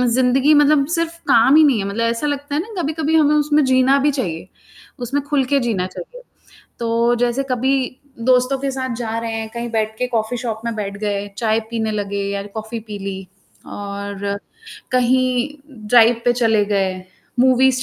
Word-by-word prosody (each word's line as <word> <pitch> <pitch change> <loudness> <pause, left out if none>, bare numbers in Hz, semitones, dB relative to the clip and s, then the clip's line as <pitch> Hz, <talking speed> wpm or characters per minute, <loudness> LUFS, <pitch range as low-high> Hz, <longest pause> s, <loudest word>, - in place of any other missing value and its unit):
ज़िंदगी 260 +3 +3
मतलब 295 -1 +4
सिर्फ़ 335 0 -2
काम 245 +6 +5
ही 315 - +7
नहीं 280 -6 +4
है 195 - -2
मतलब 215 +4 -1
ऐसा 230 +5 -1
लगता 285 0 -3
है 305 - +1
ना 405 -1 -5
कभी-कभी 315 +1 -1
हमें 300 -1 +4
उसमें 300 0 +3
जीना 260 +1 +4
भी 290 +2 +2
चाहिए, 180 - -4 0.5
उसमें 265 +4 -2
खुल 285 -1 +1
के 280 +2 +2
जीना 215 -8 -1
चाहिए। - - -10 0.6
तो 235 +1 +1
जैसे 245 +2 +1
कभी 255 +2 +1 0.5
दोस्तों 255 +1 +3
के 275 +1 -2
साथ 260 -2 -3
जा 225 -2 -3
रहे 230 0 -4
हैं, 225 0 -4
कहीं 235 0 -4
बैठ 220 -1 -1
के 250 - 0
कॉफी 230 0 -1
शॉप 230 -2 -4
में 235 -1 -2
बैठ 200 -1 -4
गए, 205 -1 -2
चाय 220 -1 +1
पीने 220 -2 -1
लगे 200 -1 -3
या 200 0 -3
कॉफी 220 +1 -5
पी 210 -2 -8
ली। 195 -1 -6 0.4
और 200 0 -5 0.5
कहीं 255 +1 +2 0.4
ड्राइव 235 0 +5
पे 245 - +4
चले 225 -3 +2
गए, 195 -2 0 0.5
मूवीज़ 260 0 +4
240 Hz, 180 wpm, -19 LUFS, 220-275 Hz, 0.6 s, ही